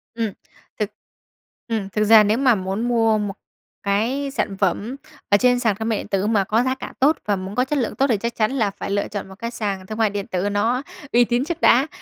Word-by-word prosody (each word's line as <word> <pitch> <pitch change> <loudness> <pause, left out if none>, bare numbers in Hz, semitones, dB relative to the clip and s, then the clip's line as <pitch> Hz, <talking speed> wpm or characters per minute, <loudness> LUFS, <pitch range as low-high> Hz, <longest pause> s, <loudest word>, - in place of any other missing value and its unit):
Ừm, 225 -3 -1 0.5
thực - - 0 0.8
ừm, 220 -4 -2
thực 210 +2 0
ra 215 0 +7
nếu 210 +2 +2
mà 260 -3 +4
muốn 195 +4 -2
mua 225 -2 +3
một 205 -2 -2 0.5
cái 240 +8 0
sản 200 -8 -2
phẩm 200 +6 0 0.3
ở 205 - +6
trên 245 +3 +3
sàn 225 -4 +1
thương 220 +1 -2
mại 220 - +1
điện - - -6
tử 195 0 0
mà 215 -3 +2
có 220 +5 +1
giá 260 +1 0
cả - - -8
tốt 290 +4 +4
và 205 - +1
muốn 190 +1 -6
có 250 - +2
chất 295 +2 -1
lượng 235 - -2
tốt 275 - +2
thì 230 -5 +2
chắc 235 +3 -3
chắn 215 0 +1
là 225 -7 0
phải 195 - -6
lựa 200 0 0
chọn 205 -2 -6
một 190 - -11
cái 235 0 -4
sàn 200 -5 -4
thương 215 - -6
mại 220 -2 +3
điện 200 -1 -4
tử 185 +2 -1
nó 225 +6 0 0.3
uy 240 +1 +5
tín 240 +3 0
trước 340 +1 -4
đã. 260 +5 +5
220 Hz, 250 wpm, -22 LUFS, 200-245 Hz, 0.8 s, ra